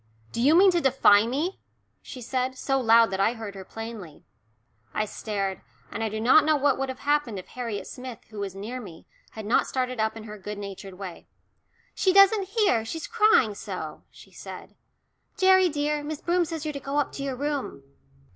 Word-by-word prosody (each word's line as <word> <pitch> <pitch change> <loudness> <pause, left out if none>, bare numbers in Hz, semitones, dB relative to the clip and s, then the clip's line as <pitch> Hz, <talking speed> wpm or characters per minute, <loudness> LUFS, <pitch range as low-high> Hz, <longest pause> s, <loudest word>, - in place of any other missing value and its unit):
"Do 235 - -3
you 290 +6 +5
mean 380 +2 +7
to 345 -1 +1
defy 230 -6 +5
me?" 300 +10 -2 0.4
she 255 -3 -9
said, 255 +2 -2
so 270 +1 0
loud 230 -3 +5
that 190 - -2
I 220 +4 +3
heard 220 -4 -7
her 195 -1 -8
plainly. 225 -7 -9 0.7
I 215 - +1
stared, 200 -2 -4 0.3
and 225 - -3
I 220 - 0
do 215 +1 -4
not 255 +7 +6
know 310 0 +3
what 285 -1 +2
would 270 0 -2
have 260 - -7
happened 290 -7 0
if 185 - -9
Harriet 230 -5 -5
Smith, 250 -2 -8
who 215 - -8
was 195 -2 -4
near 230 +6 -6
me, 175 -7 -12 0.3
had 220 -1 -7
not 220 - +2
started 255 -2 -2
up 220 +1 0
in 220 - -8
her 210 -1 -9
good 210 +2 -6
natured 195 -1 -8
way. 185 -3 -9 0.7
"She 375 - +2
doesn't 395 0 +5
hear; 400 - +2
she's 315 +8 -5
crying 425 - +4
so," - - -7
she - - -17
said. - - -10 0.6
"Gerry, 375 -1 +5
dear, 295 0 -1
Miss 300 0 -5
Broom 350 0 +1
says 325 -2 -5
you're 305 - -2
to 280 - -5
go 275 +1 -4
up 290 - +1
to 275 - -6
your 270 -2 -3
room." 285 - -3
250 Hz, 205 wpm, -26 LUFS, 215-295 Hz, 0.7 s, mean